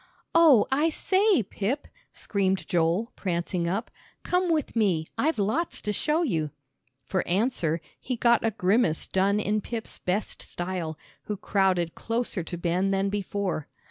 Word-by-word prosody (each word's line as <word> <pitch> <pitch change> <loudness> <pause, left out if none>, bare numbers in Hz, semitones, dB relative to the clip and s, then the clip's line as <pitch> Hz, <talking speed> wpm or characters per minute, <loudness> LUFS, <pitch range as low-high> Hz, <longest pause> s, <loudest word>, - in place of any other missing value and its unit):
"Oh, 315 -10 +7
I 295 +5 +3
say, 380 - +2
Pip," 210 +8 -3 0.2
screamed 195 -2 -1
Joel, 175 +7 +1
prancing 175 -1 -1
up, 200 +6 -2 0.3
"come 360 0 +1
with 310 -6 0
me, 190 -8 +2
I've 315 +3 +1
lots 220 - 0
to 210 - -1
show 305 - +1
you." 165 - 0 0.6
For 185 - 0
answer 175 -4 +1 0.2
he 255 - -3
got 235 0 +3
a 225 - +3
grimace 195 -4 +2
done 195 +2 +2
in 210 0 0
Pip's 225 +1 -6
best 190 +4 -2
style, 175 -3 -4 0.3
who 210 - -3
crowded 190 -4 +1
closer 230 -4 -1
to 175 +2 -6
Ben 175 +3 0
than 195 0 +1
before. 200 -5 -2
200 Hz, 145 wpm, -27 LUFS, 180-240 Hz, 0.6 s, Oh